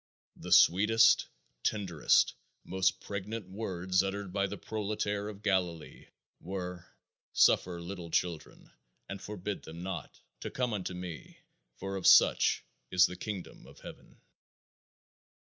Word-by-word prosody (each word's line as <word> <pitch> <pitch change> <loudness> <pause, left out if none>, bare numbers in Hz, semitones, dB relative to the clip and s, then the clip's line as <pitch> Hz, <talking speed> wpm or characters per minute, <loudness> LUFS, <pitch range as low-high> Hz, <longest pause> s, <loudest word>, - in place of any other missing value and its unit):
The - - -9
sweetest, 110 +5 +6 0.3
tenderest, 95 -7 +2 0.3
most 95 0 0
pregnant 100 +1 -5
words 95 -3 0
uttered 95 -1 -4
by 100 0 +1
the 100 +1 -6
proletaire 105 0 -3
of 105 0 -11
Galilee 90 -6 -1 0.3
were: 90 -1 -6 0.5
"Suffer 90 -1 +3
little 85 -1 -7
children, 85 -1 -3 0.4
and 100 0 -7
forbid 105 -1 -5
them 85 +2 -9
not, 90 -6 -6 0.2
to - - -5
come 125 -3 -1
unto 95 -3 -3
me; 90 -3 -8 0.4
for 95 +1 -5
of 95 - 0
such - - +6 0.3
is 90 0 +5
the 90 - -4
kingdom 95 0 -7
of - - -16
heaven." - - -12
95 Hz, 125 wpm, -31 LUFS, 90-100 Hz, 0.5 s, sweetest